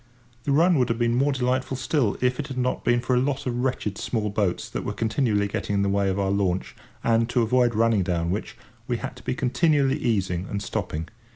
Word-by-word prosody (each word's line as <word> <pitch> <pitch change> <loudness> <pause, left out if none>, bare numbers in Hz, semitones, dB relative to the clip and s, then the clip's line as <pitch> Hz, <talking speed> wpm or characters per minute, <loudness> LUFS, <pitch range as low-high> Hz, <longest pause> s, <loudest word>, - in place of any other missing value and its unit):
The 140 - 0
run 165 +2 +4
would 125 - +2
have 115 - 0
been 120 0 +1
more 135 +4 +2
delightful 130 0 -1
still, 125 -3 0
if 125 +1 +1
it 145 - -3
had 135 -3 -7
not 125 0 -1
been 120 0 +2
for 125 - 0
a - - +4
lot 135 +1 -1
of 120 -1 -2
wretched 110 -6 -2
small 105 -3 -1
boats 100 -4 -1
that - - -5
were - - -3
continually 110 -3 +1
getting 100 0 -2
in 100 - +2
the 100 - +1
way 100 0 +1
of 95 - -1
our 100 -1 0
launch, 95 -2 -1 0.3
and, 115 0 +2
to 120 -1 +2
avoid 120 0 +2
running 115 -2 +3
down 85 -2 -1
which, 100 - -4 0.3
we - - 0
had - - -6
to - - -13
be - - -2
continually 140 +1 +2
easing 95 -5 0
and 100 0 -3
stopping. 80 -3 -3
115 Hz, 230 wpm, -25 LUFS, 100-130 Hz, 0.3 s, run